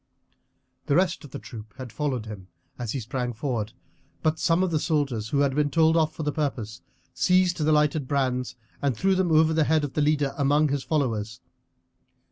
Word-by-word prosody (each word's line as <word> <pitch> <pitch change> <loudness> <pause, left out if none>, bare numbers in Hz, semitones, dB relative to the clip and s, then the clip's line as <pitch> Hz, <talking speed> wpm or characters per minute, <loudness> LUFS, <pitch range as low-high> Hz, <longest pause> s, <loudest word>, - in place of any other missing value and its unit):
The 140 - +2
rest 180 -1 +1
of - - -11
the - - -7
troop 110 -1 -11
had 130 -3 -8
followed 135 -7 -2
him 105 -4 -9 0.3
as 120 -3 -3
he 135 - -2
sprang 125 +1 -3
forward, 115 -3 -3 0.5
but 155 0 +1
some 170 +1 +2
of 185 - 0
the 155 - +1
soldiers, 140 -10 -1
who 140 +2 +1
had 140 -2 +2
been 145 +1 +1
told 160 +1 +3
off 160 -2 +2
for 160 - -4
the 150 - 0
purpose, 120 - -3 0.3
seized 180 -1 +2
the 155 -1 +1
lighted 150 -2 +2
brands 130 -3 -1 0.3
and 135 -5 0
threw 195 - +2
them 185 -2 +1
over 160 0 +4
the 160 -1 +2
head 155 0 +2
of 145 - -4
the 150 - 0
leader 145 -2 +1
among 145 +2 +3
his 140 -1 -1
followers. 115 -7 -1
145 Hz, 200 wpm, -25 LUFS, 125-155 Hz, 0.5 s, over